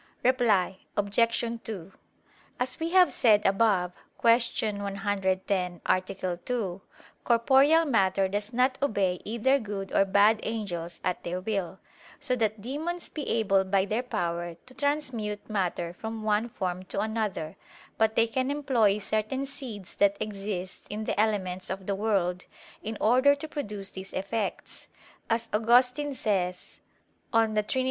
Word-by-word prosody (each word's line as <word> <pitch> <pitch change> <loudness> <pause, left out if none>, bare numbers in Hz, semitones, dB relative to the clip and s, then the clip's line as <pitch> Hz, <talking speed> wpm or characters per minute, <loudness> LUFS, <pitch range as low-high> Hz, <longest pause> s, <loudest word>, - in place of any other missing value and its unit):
Reply 225 -8 +2 0.2
Obj. 230 +3 +1
2: 195 -4 -7 0.7
As 250 +1 -1
we 325 +1 -1
have 365 0 +5
said 215 -5 +4
above 195 -3 +3 0.3
(Q. 230 0 +6 0.4
110, 195 -2 -1
A. 185 - +3
2), 185 +1 -4 0.4
corporeal 270 +7 +5
matter 195 -7 +2
does 205 +3 -3
not 255 +2 +1
obey 195 -9 +1
either 235 +6 +2
good 200 -4 -5
or - - +5
bad 205 +3 +4
angels 180 -7 -4
at 180 - -1
their 180 +1 -3
will, 190 -2 -3 0.4
so 290 -4 0
that 220 -3 -1
demons 315 +9 -4
be 300 - -5
able 195 -4 +3
by 190 0 +2
their 215 +4 -1
power 175 -7 -3
to 255 - -14
transmute 260 -7 -2
matter 180 -4 -2
from 220 +3 -6
one 215 +2 +1
form 185 -4 -3
to 195 - -4
another; 210 -7 -2 0.4
but 220 0 +3
they 230 - +5
can 255 +3 -1
employ 255 -8 +2
certain 215 +6 -2
seeds 250 -9 -8
that 200 0 +3
exist 195 -3 -5
in 210 +1 -4
the 215 - -2
elements 190 -4 0
of 190 0 -4
the 200 - -1
world, 195 -3 0 0.4
in 220 0 -5
order 255 +6 +5
to 285 +2 -7
produce 210 -10 -4
these 190 0 -8
effects, 200 +2 -4 0.4
as 230 0 +1
Augustine 250 +6 +3
says 180 -6 -2 0.5
(De 220 -2 +3
Trin. 210 +5 -2
210 Hz, 140 wpm, -28 LUFS, 190-240 Hz, 0.7 s, Q